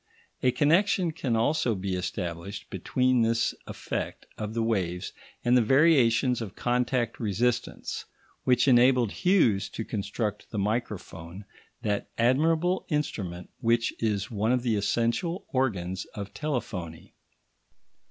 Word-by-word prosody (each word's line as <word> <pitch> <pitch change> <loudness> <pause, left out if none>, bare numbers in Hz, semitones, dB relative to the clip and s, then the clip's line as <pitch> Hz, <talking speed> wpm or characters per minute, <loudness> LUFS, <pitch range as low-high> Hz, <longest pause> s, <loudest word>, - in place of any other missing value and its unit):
A 130 - +4
connection 170 - +3
can 135 -7 -1
also 120 0 +2
be 95 0 -3
established 90 +1 -4
between 125 +6 +1
this 115 0 +2
effect - - -4
of 105 +1 -5
the 115 - +1
waves 90 -6 -1 0.3
and 120 +1 +4
the 125 - +6
variations 130 -2 +4
of 105 -2 -6
contact 125 -1 0
resistance 115 +2 -1 0.4
which 125 +2 +3
enabled 125 -3 +5
Hughes 175 - +2
to 115 - -5
construct 105 0 -3
the 110 - -5
microphone, 100 -4 -3 0.4
that 100 -1 -1
admirable 160 +9 +2
instrument 100 - -3
which 115 0 +2
is 105 -3 -1
one 110 +1 0
of 125 -1 +1
the 115 -3 +1
essential 120 - 0
organs 95 - -1
of 100 -1 -6
telephony. 100 - -4
115 Hz, 125 wpm, -27 LUFS, 100-130 Hz, 0.4 s, the